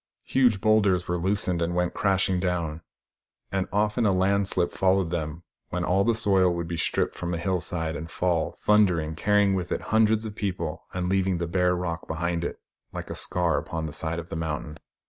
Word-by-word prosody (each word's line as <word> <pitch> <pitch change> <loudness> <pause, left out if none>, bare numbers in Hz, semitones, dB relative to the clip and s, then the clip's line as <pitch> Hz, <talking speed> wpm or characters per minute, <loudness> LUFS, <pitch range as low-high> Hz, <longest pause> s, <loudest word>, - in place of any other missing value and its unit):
Huge 125 -7 +3
boulders 105 -5 +3
were 90 0 -1
loosened 90 -1 0
and 85 +1 -1
went 90 0 0
crashing 95 -2 +1
down; 85 -3 -2 0.7
and 95 -1 -1
often 105 +3 +1
a 105 - +4
landslip 95 -1 +2
followed 95 -2 +1
them, 80 -1 -3 0.3
when 90 0 -2
all 95 +2 +2
the 115 +1 +2
soil 95 -5 +4
would 85 -1 -3
be 85 - -3
stripped 80 - 0
from 85 0 -3
a - - -2
hill 90 +2 0
side 80 -2 -2
and 80 0 -6
fall, 85 -2 0
thundering, 90 -7 +3
carrying 100 +3 +2
with 90 -2 -2
it - - -1
hundreds 110 0 +3
of 105 -2 -6
people 90 -7 -4
and 90 -1 -2
leaving 95 -1 +1
the 85 - -2
bare 90 +1 +1
rock 85 -2 -4
behind 85 +1 -2
it, - - -4 0.3
like - - -6
a - - -4
scar 85 -3 0
upon 80 -1 -4
the 75 - -6
side 80 +1 -2
of 85 0 -6
the - - -5
mountain. 80 -1 -4
90 Hz, 200 wpm, -26 LUFS, 85-100 Hz, 0.7 s, a